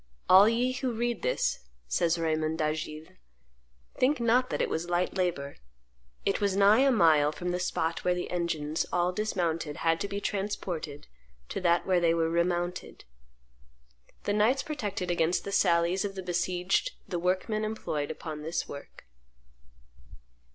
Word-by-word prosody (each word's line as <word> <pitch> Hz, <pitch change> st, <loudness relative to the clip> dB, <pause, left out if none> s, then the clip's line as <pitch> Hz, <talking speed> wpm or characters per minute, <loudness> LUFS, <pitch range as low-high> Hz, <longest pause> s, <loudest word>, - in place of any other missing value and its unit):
"All 195 Hz, +3 st, +8 dB
ye 245 Hz, +2 st, +1 dB
who 255 Hz, 0 st, -2 dB
read 235 Hz, 0 st, -2 dB
this," 125 Hz, -, 0 dB, 0.3 s
says 165 Hz, -, +1 dB
Raymond 160 Hz, -1 st, 0 dB
d'Agiles, 155 Hz, 0 st, -3 dB, 0.9 s
"think 270 Hz, +3 st, +3 dB
not 245 Hz, +2 st, +3 dB
that -, -, -2 dB
it -, -, +1 dB
was 170 Hz, +2 st, -3 dB
light 175 Hz, +1 st, 0 dB
labor; 170 Hz, -7 st, -2 dB, 0.7 s
it -, -, 0 dB
was 200 Hz, -2 st, +1 dB
nigh 200 Hz, +3 st, +6 dB
a 275 Hz, +1 st, +5 dB
mile 155 Hz, -, +4 dB
from 180 Hz, +3 st, -4 dB
the 180 Hz, -, -1 dB
spot 165 Hz, -2 st, -1 dB
where 180 Hz, 0 st, +2 dB
the 180 Hz, -, -4 dB
engines, 165 Hz, -3 st, -1 dB
all 175 Hz, +1 st, +1 dB
dismounted, 170 Hz, -6 st, -2 dB
had 165 Hz, 0 st, +2 dB
to -, -, -1 dB
be 200 Hz, 0 st, -4 dB
transported 190 Hz, -8 st, -4 dB, 0.4 s
to -, -, -4 dB
that 175 Hz, -1 st, +2 dB
where 185 Hz, -2 st, +3 dB
they 170 Hz, -1 st, +3 dB
were 165 Hz, -1 st, +1 dB
remounted." 175 Hz, +1 st, -1 dB, 1.2 s
The 205 Hz, -, 0 dB
knights 235 Hz, +6 st, +2 dB
protected 210 Hz, -, -3 dB
against 175 Hz, +1 st, +1 dB
the 200 Hz, -, -5 dB
sallies 170 Hz, 0 st, +2 dB
of 200 Hz, -1 st, -4 dB
the 190 Hz, -, -5 dB
besieged 180 Hz, -, 0 dB
the 180 Hz, -3 st, -3 dB
workmen 190 Hz, +5 st, 0 dB
employed 185 Hz, -9 st, -3 dB
upon 155 Hz, -2 st, -6 dB
this 160 Hz, +2 st, -3 dB
work. 140 Hz, -, -10 dB
180 Hz, 155 wpm, -29 LUFS, 165-205 Hz, 1.2 s, All